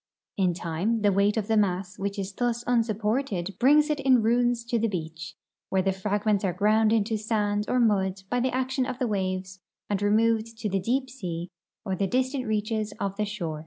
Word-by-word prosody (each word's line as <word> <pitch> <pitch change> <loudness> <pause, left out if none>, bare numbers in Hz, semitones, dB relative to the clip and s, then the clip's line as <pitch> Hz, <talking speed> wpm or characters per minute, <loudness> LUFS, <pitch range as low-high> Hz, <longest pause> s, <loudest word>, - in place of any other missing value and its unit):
In 185 -3 +1
time 180 +7 -1
the 205 - +5
Aveight 200 +3 +2
of 210 -2 -1
the 225 - +2
mass 195 -1 0
Avhich 200 +1 -3
is 195 0 -4
thus 240 +1 -1
unsupported 220 -4 0
brings 295 +4 +5
it 300 - -1
in 260 -4 +4
ruins 240 +1 +2
to 235 -1 0
the 230 - +1
beach, 165 -4 -5 0.4
Avhere 190 0 +1
the 195 - +3
fragments 205 +1 0
are 185 -3 0
ground 215 +3 +3
into 225 0 +1
santl 210 -1 0
or 250 - +2
mud 195 -4 +1
by 245 +5 0
the 255 +2 +1
action 260 0 -1
of 255 -2 -4
the 255 - 0
AvaAX'S 190 -3 -2 0.3
and 200 - +1
rcmoA'cd 220 +2 +1
to 220 -1 -3
the 195 0 0
deep 255 +7 0
sea 180 -9 -5 0.4
or 190 -2 -1
the 195 +1 0
distant 255 +3 -1
reaches 215 0 -1
of 195 -1 -2
the 210 - 0
shore. 175 -7 -4
210 Hz, 200 wpm, -26 LUFS, 195-235 Hz, 0.4 s, the